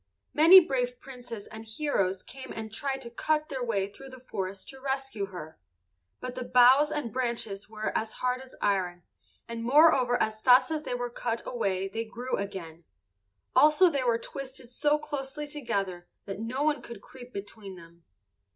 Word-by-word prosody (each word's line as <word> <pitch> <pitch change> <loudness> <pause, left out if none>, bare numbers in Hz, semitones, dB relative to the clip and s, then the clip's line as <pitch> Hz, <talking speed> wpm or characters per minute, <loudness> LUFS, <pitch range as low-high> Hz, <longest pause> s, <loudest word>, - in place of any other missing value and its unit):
Many 330 +5 +10
brave 250 -7 -1
princes 245 -5 -8
and 220 0 -9
heroes 215 -6 -1
came 265 0 -10
and 220 -1 -6
tried 270 +2 -2
to 235 -2 -9
cut 305 +5 0
their 265 -3 -3
way 200 -5 0
through 270 +7 -12
the 260 -1 -11
forest 195 -5 -5
to 265 -1 -11
rescue 270 -6 -2
her, 160 -5 -9 0.6
but 255 -1 -5
the 255 0 -4
boughs 255 +5 +6
and 290 -7 -3
branches 230 -6 -3
were 215 0 -4
as 220 0 -1
hard 250 0 -1
as 260 -1 -13
iron, 180 -3 0 0.4
and 230 0 -5
moreover 255 -2 +5
as 215 0 -1
fast 255 +5 +6
as 310 -1 -1
they 250 - -3
were 245 0 -3
cut 235 -1 -3
away 195 -6 -1
they 225 +4 -3
grew 240 +3 -4
again; 170 -5 -6 0.7
also 310 +4 +6
they 280 -3 0
were 235 -2 +2
twisted 260 0 -8
so 295 +4 +2
closely 295 -1 -5
together 200 -12 -3 0.2
that 195 0 -6
no 245 +6 -2
one 300 -3 +1
could 235 -4 -10
creep 250 -1 -12
between 200 -2 -8
them. 170 -1 -16
245 Hz, 175 wpm, -28 LUFS, 205-270 Hz, 0.7 s, Many